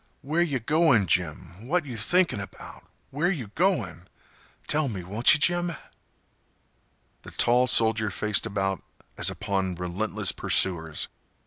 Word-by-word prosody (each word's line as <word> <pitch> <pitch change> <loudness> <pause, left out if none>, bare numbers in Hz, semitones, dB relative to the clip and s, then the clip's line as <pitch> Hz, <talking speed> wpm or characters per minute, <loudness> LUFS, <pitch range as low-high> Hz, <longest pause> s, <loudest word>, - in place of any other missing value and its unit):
"Where 155 +5 0
yeh 155 -6 0
goin', 135 - +2
Jim? 90 +4 -2
What 175 +2 0
you 125 -4 -7
thinking 170 - +1
about? 100 - -10 0.3
Where 150 +6 0
you 135 - -4
going? 120 - -1 0.6
Tell 155 -1 0
me, 100 -7 -5
won't 105 +10 +4
you, - - -2
Jim?" 175 +2 0 1.5
The - - -11
tall 125 +2 +3
soldier 110 -3 +3
faced 105 +3 -1
about 95 -3 -2 0.3
as - - +2
upon 95 -3 -2
relentless 90 +5 -1
pursuers. 80 -5 +1
110 Hz, 130 wpm, -26 LUFS, 95-150 Hz, 1.5 s, won't